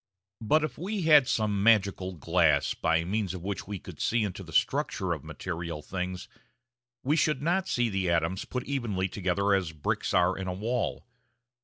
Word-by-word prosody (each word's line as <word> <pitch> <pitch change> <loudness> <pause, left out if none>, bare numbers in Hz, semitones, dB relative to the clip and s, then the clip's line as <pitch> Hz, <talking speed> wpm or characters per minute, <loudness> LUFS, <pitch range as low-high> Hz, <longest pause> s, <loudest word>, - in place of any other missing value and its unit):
] 95 +3 -64
But 155 0 +5
if 155 - -4
we 195 +2 -3
had 150 -5 +6
some 105 -3 0
magical 100 -4 +3
glass 80 -3 +2
by 80 0 +1
means 95 0 -2
of 90 - -8
which 100 -2 -4
we 100 -1 -4
could - - -11
see 115 -1 +1
into 100 -4 -4
the - - -10
structure - - +1
of - - -7
material 85 -3 -5
things, 90 -1 -4 0.8
we 145 +4 +2
should 150 -3 +1
not 180 +4 +1
see 120 -1 +1
the 95 -4 -1
atoms 85 +2 0
put 125 -1 -4
evenly 115 -9 -1
together 100 +1 0
as 90 -5 0
bricks 75 - -2
are 90 +1 +3
in 95 -1 -5
a 90 - -2
wall. 115 +5 -2
95 Hz, 185 wpm, -28 LUFS, 90-120 Hz, 0.8 s, had